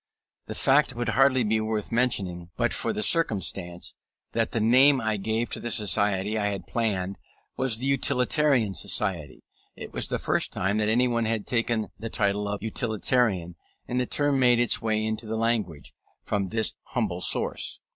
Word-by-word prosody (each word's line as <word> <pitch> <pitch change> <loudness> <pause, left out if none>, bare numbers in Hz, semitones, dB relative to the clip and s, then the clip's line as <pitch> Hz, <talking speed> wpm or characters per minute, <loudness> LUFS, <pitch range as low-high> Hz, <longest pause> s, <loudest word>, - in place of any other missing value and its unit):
The - - -6
fact - - +3
would 120 -1 -2
hardly 130 +2 +3
be 110 0 +1
worth 110 0 -3
mentioning, 95 -8 -1
but - - 0
for - - -1
the 105 - -2
circumstance, 95 - +1 0.4
that 115 -1 0
the 115 - -2
name 130 +5 +5
I 110 -2 -1
gave 110 +4 -2
to - - -4
the 120 - -4
society 105 -1 +2
I 105 - 0
had 100 -3 -4
planned 100 -5 -2 0.4
was 130 -4 0
the 125 - -4
Utilitarian 135 -3 +2
Society. 95 -7 0 0.3
It - - -10
was - - -1
the - - -1
first - - 0
time 100 +3 -1
that 105 0 +1
anyone 120 0 +1
had 110 -2 -2
taken 115 -2 -1
the 115 - -5
title 100 -1 -1
of 100 0 -4
Utilitarian; 110 -6 0 0.3
and 125 - -1
the 125 - -1
term 145 -2 0
made 125 -2 +4
its 120 - +3
way 110 -1 0
into 110 +1 -4
the 110 +1 -3
language, 110 -9 -2 0.3
from 100 -2 -2
this 110 +1 0
humble - - -3
source. - - 0
110 Hz, 175 wpm, -26 LUFS, 100-120 Hz, 0.4 s, name